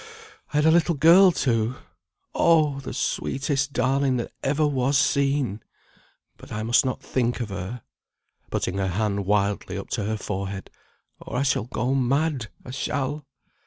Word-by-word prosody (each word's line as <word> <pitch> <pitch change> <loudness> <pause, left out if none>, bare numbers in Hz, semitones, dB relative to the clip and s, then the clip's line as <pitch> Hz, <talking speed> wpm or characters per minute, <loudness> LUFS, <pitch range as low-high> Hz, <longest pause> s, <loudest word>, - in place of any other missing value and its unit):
I 150 - -1
had 150 - +3
a 160 - +6
little 170 0 +3
girl, 175 +6 +7
too. 115 -5 0 0.6
Oh! 155 -4 +3
the 135 - -7
sweetest 135 +2 -1
darling 130 +1 +1
that 120 - -4
ever 145 +3 +1
was 135 -1 +1
seen! 140 -8 +1 0.8
But - - -14
I 105 +1 -3
must 120 +5 +4
not 130 -1 -3
think 125 -1 -1
of 120 -3 -3
her," 100 +5 -6 0.7
putting 95 - -2
her 95 - 0
hand 100 +1 -1
wildly 100 0 0
up - - -7
to 105 - -1
her 110 +1 -1
forehead, 100 -1 -5 0.5
"or - - -6
I 135 - +1
shall 135 -6 +1
go 125 +1 -1
mad; 135 0 0 0.2
I 125 - -7
shall." 140 +2 -3
130 Hz, 160 wpm, -24 LUFS, 110-140 Hz, 0.8 s, girl